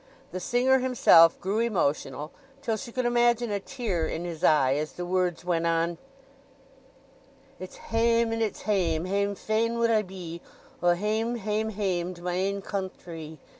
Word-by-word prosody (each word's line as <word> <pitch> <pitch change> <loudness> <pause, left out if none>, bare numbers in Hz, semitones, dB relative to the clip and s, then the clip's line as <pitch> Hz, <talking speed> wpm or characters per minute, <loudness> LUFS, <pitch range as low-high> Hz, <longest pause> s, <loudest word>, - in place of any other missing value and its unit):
The 185 - -4
singer 250 +7 +2
himself 230 -10 +5
grew 200 +4 -1
emotional, 150 - -1 0.3
till 225 -4 0
she 235 +2 -7
could 255 +1 -2
imagine 240 -1 +2
a 200 - 0
tear 195 -8 -2
in 170 - -4
his 170 -3 -6
eye 135 -4 +4
as 150 +2 -3
the 175 - -5
words 180 -1 -1
went 170 -2 0
on:— 165 0 0 1.6
"It's 185 - -9
hame, 230 0 +1
and 225 - -2
it's 215 -3 -2
hame, 175 -6 0
hame 200 +2 0
fain 225 +3 -1
would 230 0 +2
I 220 -1 +4
be, 180 -4 -8 0.4
O 175 0 +4
hame, 220 +5 -1
hame, 215 0 -2
hame 185 -4 -2
to 175 - -14
my 180 0 -2
ain 195 +2 -1
countree! 170 -6 -6
195 Hz, 165 wpm, -27 LUFS, 170-225 Hz, 1.6 s, himself